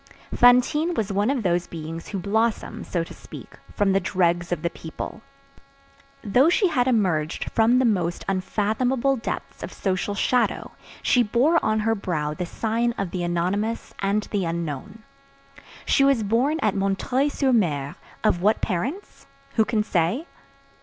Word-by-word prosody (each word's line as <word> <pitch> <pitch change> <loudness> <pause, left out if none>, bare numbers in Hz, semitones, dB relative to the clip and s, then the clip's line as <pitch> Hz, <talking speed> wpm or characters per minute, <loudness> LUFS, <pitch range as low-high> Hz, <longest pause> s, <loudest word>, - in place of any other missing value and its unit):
Fantine 250 +8 +4
was 215 -5 -1
one 205 +4 +1
of 270 -4 0
those 175 -1 +1
beings 165 0 -7
who 200 - -4
blossom, 220 +4 -1
so 170 -2 -2
to - - -10
speak, - - -12 0.2
from 200 -2 +2
the 195 - +3
dregs 175 -2 0
of 175 - -2
the 170 - +1
people. 160 +6 -7 1.0
Though 250 +8 +4
she 375 +2 +3
had 250 -5 +1
emerged 180 -10 0
from 230 +2 +4
the 260 - +3
most 180 -6 0
unfathomable 225 +8 0
depths 225 - -5
of - - -6
social 190 +1 -2
shadow, 245 +4 0 0.3
she 250 - +4
bore 250 +9 +2
on 215 0 +1
her 225 +1 +1
brow 160 -8 -2
the 180 +2 -4
sign 230 +5 -1
of 195 -3 -3
the 180 - -3
anonymous 185 +6 -1
and 200 +2 0
the 205 -3 0
unknown. 170 +5 -4 0.8
She 275 - +3
was 275 -5 +3
born 250 +10 +1
at 215 -3 +2
M. 195 -1 0 0.3
sur 275 -1 0
M. 150 - +1 0.3
Of 175 - +2
what 210 +3 +3
parents? 255 - -4 0.3
Who 220 - +3
can 215 -2 0
say? 190 - 0
210 Hz, 160 wpm, -24 LUFS, 175-240 Hz, 1.0 s, Fantine